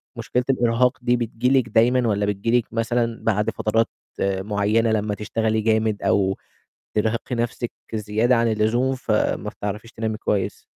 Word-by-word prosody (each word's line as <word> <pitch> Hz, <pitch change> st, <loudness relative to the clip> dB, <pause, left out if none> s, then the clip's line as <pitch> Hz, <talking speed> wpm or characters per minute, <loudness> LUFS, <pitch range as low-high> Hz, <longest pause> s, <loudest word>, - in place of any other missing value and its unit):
مشكلة 125 Hz, 0 st, -1 dB
الإرهاق 120 Hz, -1 st, +2 dB
دي 120 Hz, 0 st, +2 dB
بتجيلِك 120 Hz, +2 st, +1 dB
دايمًا 120 Hz, +2 st, +3 dB
والَّا 100 Hz, -1 st, +1 dB
بتجيلِك 115 Hz, +4 st, 0 dB
مثلًا 115 Hz, 0 st, 0 dB
بعد 105 Hz, -1 st, +1 dB
فترات، 115 Hz, 0 st, +1 dB, 0.3 s
آآ، 95 Hz, -1 st, 0 dB
معيّنة 105 Hz, +2 st, +1 dB
لمّا 105 Hz, -1 st, 0 dB
تشتغلي 110 Hz, +1 st, -1 dB
جامد 110 Hz, -1 st, +1 dB
أو 95 Hz, -1 st, +2 dB, 0.6 s
ترهقي 110 Hz, +3 st, -1 dB
نفسِك 120 Hz, 0 st, -2 dB, 0.2 s
زيادة 110 Hz, +4 st, +1 dB
عن 115 Hz, 0 st, +2 dB
اللزوم 120 Hz, +5 st, +1 dB
فما 105 Hz, -3 st, -1 dB
بتعرفيش 105 Hz, +2 st, -6 dB
تنامي 110 Hz, -1 st, -3 dB
كويس؟ 100 Hz, -2 st, -1 dB
115 Hz, 140 wpm, -23 LUFS, 105-120 Hz, 0.6 s, دايمًا